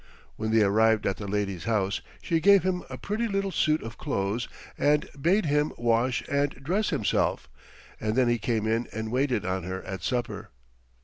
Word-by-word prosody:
When 110 0 -3
they 110 -1 +4
arrived 110 +2 +3
at 95 - 0
the 100 - -6
lady's 100 -3 -2
house 105 -3 0 0.2
she 165 - +1
gave 200 +2 +6
him 185 -1 0
a - - -6
pretty 220 +3 -2
little 195 -2 -1
suit 155 -3 +1
of 115 0 -8
clothes 115 -4 -1 0.3
and 150 0 +2
bade 185 +6 +3
him 150 0 +1
wash 120 +1 +1
and 140 0 +1
dress 185 +10 -1
himself, 105 - 0 0.5
and 110 0 -1
then 130 -1 +3
he 120 0 +2
came 110 -1 -1
in 115 +2 0
and 110 0 -4
waited 125 -5 +1
on 95 0 -1
her 95 +2 -5
at 95 -2 -6
supper. 120 +5 -3
120 Hz, 185 wpm, -27 LUFS, 105-150 Hz, 0.5 s, gave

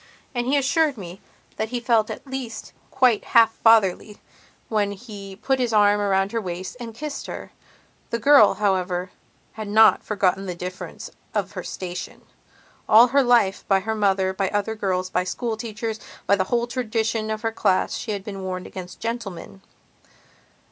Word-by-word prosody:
And 240 -1 -2
he 280 +2 +3
assured 285 +1 +2
me 180 -1 -9 0.4
that 220 0 -2
he 245 0 -2
felt 230 -3 +2
at - - -7
least 260 -4 -6 0.2
quite 255 -5 +3
half 225 -1 +6
fatherly 215 -2 +3 0.5
when 205 -2 0
he 200 -2 -10
put 265 +6 -1
his 245 -3 0
arm 205 -1 +4
around 195 -1 +1
her 230 - -1
waist 180 +1 -6
and 230 -2 -8
kissed 295 +3 -6
her. - - -7 0.6
The 230 - -1
girl, 275 -1 +6
however, 185 -3 -1 0.4
had 215 -1 -7
not 220 +2 +5
forgotten 195 -2 0
the 180 - -4
difference 180 +1 -7 0.2
of - - -1
her - - -6
station. 180 -1 -7 0.7
All 230 +3 +8
her 280 +2 +4
life, 235 -6 +3
by 195 -1 +3
her 220 +3 -2
mother, 195 -3 +1
by 190 0 -1
other 205 +1 -1
girls, 185 -3 -2
by 180 - +1
schoolteachers, 220 +1 -4 0.3
by 200 - +4
the 190 -1 0
whole 235 +4 0
tradition 225 -3 -2
of 215 +1 -3
her 225 - 0
class 190 -4 +1
she 240 - -6
had 200 -2 -3
been 195 -1 -7
warned 185 -1 -4
against 180 -1 -9
gentlemen. 205 -5 -5
215 Hz, 170 wpm, -23 LUFS, 190-235 Hz, 0.7 s, All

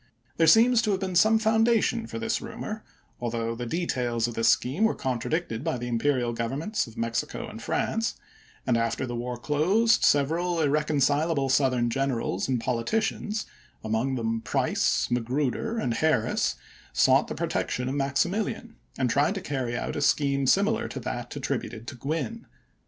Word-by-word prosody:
There 165 - +4
seems 230 +6 +6
to 220 - -1
have 195 -2 +1
been 190 -1 -3
some 220 +5 +5
founda 225 +1 +3
tion 230 -1 -1
for - - -6
this 230 +1 -1
rumor, 215 0 -6 0.4
although 115 -1 -2
the 120 +1 -5
details 120 -7 -1
of 120 - -5
the 115 - -3
scheme 135 - +2
were 220 - +3
contradicted 130 0 -2
by 160 -5 -1
the 120 0 -5
imperial 120 0 0
govern 115 +3 -2
ments 210 - -2
of 115 0 -14
Mexico 115 0 -2
and - - -9
France; 225 0 -1 0.5
and 120 -2 +2
after 115 +2 -1
the 120 -1 -5
war 120 +1 -4
closed 185 - +2
several 165 +5 +2
irreconcilable 150 -1 +1
Southern 130 -3 +2
generals 125 -7 -1
and 130 -2 0
politicians, 210 - -1 0.4
among 110 +5 0
them 115 -2 -1
Price, - - +1
Magruder, 130 - -1
and 125 - 0
Harris, 130 -3 +1 0.4
sought - - +4
the - - -5
protection 125 0 -2
of 130 - -2
Maximilian, 180 - -1 0.2
and 130 - +1
tried 140 - +2
to - - -2
carry 130 -6 -3
out - - -3
a - - -2
scheme 140 -2 +2
similar 215 - +2
to 135 - -6
that 120 +1 -5
attributed 125 -5 -4
to - - -8
Gwin. 160 - -4
140 Hz, 165 wpm, -27 LUFS, 120-190 Hz, 0.5 s, seems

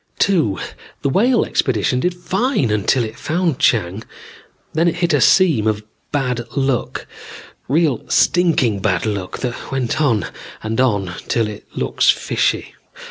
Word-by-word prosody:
(2) 160 - +2 0.5
The 140 - +2
Whale 235 - +3
expedition 125 0 0
did 180 +6 0
fine 175 - 0
till 130 -3 +3
it 110 0 -7
found 165 -3 -1
Chang. 105 -3 +1 0.7
Then 165 +2 +2
it 170 - +1
hit 175 0 0
a - - +3
seam 155 - +4
of 105 -1 0 0.3
bad 125 -4 -1 0.2
luck. 135 -3 -1 0.6
Real 150 -2 +1
stinking 150 - +2
bad 95 -2 0
luck 100 -4 -3
that 125 -2 -5
went 135 +2 -1
on 120 -8 +2 0.4
and 110 +3 0
on 100 -8 0
till 115 -2 +1
it 105 -1 -9
looks - - +1
fishy. - - 0
130 Hz, 140 wpm, -19 LUFS, 110-170 Hz, 0.7 s, seam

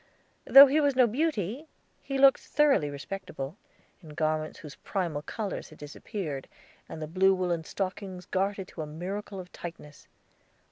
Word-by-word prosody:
Though 275 +1 +11
he 290 +3 +2
was 285 -2 +2
no 255 -1 +6
beauty, 255 - -1 0.3
he 275 - -3
looked 270 0 +6
thoroughly 280 - +2
respectable, 155 0 -6 0.5
in 155 -4 -12
garments 155 0 -1
whose 150 -2 -10
primal 170 -7 -3
colors 205 +5 -5
had 155 - -15
disappeared, 150 - -6 0.4
and 155 0 -7
blue 190 +1 +4
woolen 175 -3 -1
stockings 185 -1 -5
gartered 195 +1 -2
to 165 - -7
a 155 - -5
miracle 190 +6 -6
of 180 -1 -10
tightness. 165 -4 -10
185 Hz, 145 wpm, -28 LUFS, 155-210 Hz, 0.5 s, Though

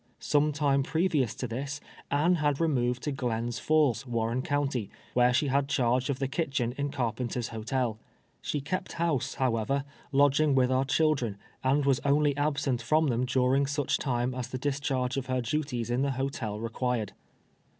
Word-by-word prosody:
Some 150 +1 +2
time 140 -1 +2
previous 155 - +1
to 125 - -4
tliis, 135 +5 -4 0.3
Anne 165 +5 +3
had 145 -2 +1
removed 125 -6 +1
to 150 - -1
Glens 120 -2 -2
Falls, 145 -7 +2
Warren 115 +1 -1
county, 140 -6 -1 0.2
where 125 0 +4
she 130 +4 +2
had 140 0 +1
charge 125 0 +1
of 140 - 0
the 135 -1 -1
kitchen 135 -5 -1
in 145 0 -2
Carpenter's 120 -1 -2
Hotel. 115 0 -2 0.4
Slie 145 -2 -3
kept 185 +4 -3
house, 150 -5 -1
how 130 -4 +1
ever, 135 +5 0 0.3
lodging 145 +1 +4
with 130 -1 +3
our 130 +1 +2
children, 135 -8 +1 0.3
and 135 +2 +2
was 135 -2 +3
only 145 0 +3
absent 145 -4 0
from 155 +6 +2
them 120 +1 +1
during 130 +2 +2
such 145 -1 0
time 125 -2 -1
as 125 -1 -4
tlie 130 - -6
discharge 135 -3 -1
of 135 -1 -3
her 130 0 0
duties 125 -2 -2
in 125 +2 +1
the 140 - +1
hotel 125 -5 -3
rec[uired. 115 -1 -2
135 Hz, 170 wpm, -29 LUFS, 125-145 Hz, 0.4 s, where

